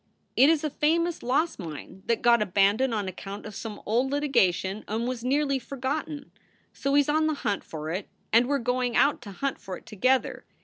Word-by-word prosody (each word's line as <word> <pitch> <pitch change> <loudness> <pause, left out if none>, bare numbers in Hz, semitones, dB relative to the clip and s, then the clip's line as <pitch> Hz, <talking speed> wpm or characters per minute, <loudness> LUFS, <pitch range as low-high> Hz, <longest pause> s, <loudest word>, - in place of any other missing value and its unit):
It 270 +4 +6
is 320 -2 +2
a 305 - -1
famous 335 +4 +1
lost 285 +6 0
mine 170 +2 -8
that 230 - 0
got 235 -1 +5
abandoned 205 +6 +3
on 210 -3 -1
account 195 +2 -7
of 215 - -7
some 210 +1 -6
old 240 +5 +1
littagation 215 -9 +1
and 225 +3 -2
was 250 -2 -4
nearly 275 +1 +1
forgotten. 280 +4 -4 0.4
So 275 0 -1
he 290 - +7
s 280 - -3
on 310 +1 +2
the 310 - 0
hunt 205 -2 0
for 155 0 -6
it 185 +3 -4 0.2
and 235 +2 +5
we 285 - 0
re 275 - -1
going 250 0 0
out 285 - +3
to 210 -4 -9
hunt 275 +8 -3
for 185 -2 -6
it - - -18
together. 255 +5 +1
245 Hz, 210 wpm, -27 LUFS, 205-285 Hz, 0.4 s, he